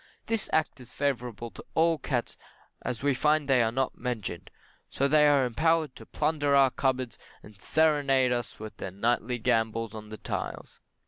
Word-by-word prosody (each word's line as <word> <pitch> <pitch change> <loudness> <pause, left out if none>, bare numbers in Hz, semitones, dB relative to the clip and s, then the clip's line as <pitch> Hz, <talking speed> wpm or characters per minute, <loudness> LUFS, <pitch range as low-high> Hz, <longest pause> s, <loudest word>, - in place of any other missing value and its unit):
This 225 -2 -2
Act 155 -3 0
is 125 -1 -13
favourable 120 -5 -2
to - - -11
all 165 -1 +3
cats 125 -3 -2 0.5
as 125 0 -4
we 145 -1 +3
find 150 +3 +2
they 130 -3 +4
are 115 -1 +2
not 130 +2 -2
mentioned, 110 -8 -4 0.4
so 140 - +1
they 150 +1 +5
are 140 -3 +4
empowered 155 +3 +1
to - - -12
plunder 145 -3 +1
our 135 -2 +5
cupboards, 130 -3 -1 0.2
and 105 -1 -15
seranade 140 -5 +3
us 120 -2 -2
with 110 0 -8
their - - -5
nightly 120 +5 0
gambols 115 -1 0
on 110 -1 -9
the 110 - -7
tiles. - - -5
130 Hz, 175 wpm, -28 LUFS, 115-145 Hz, 0.5 s, they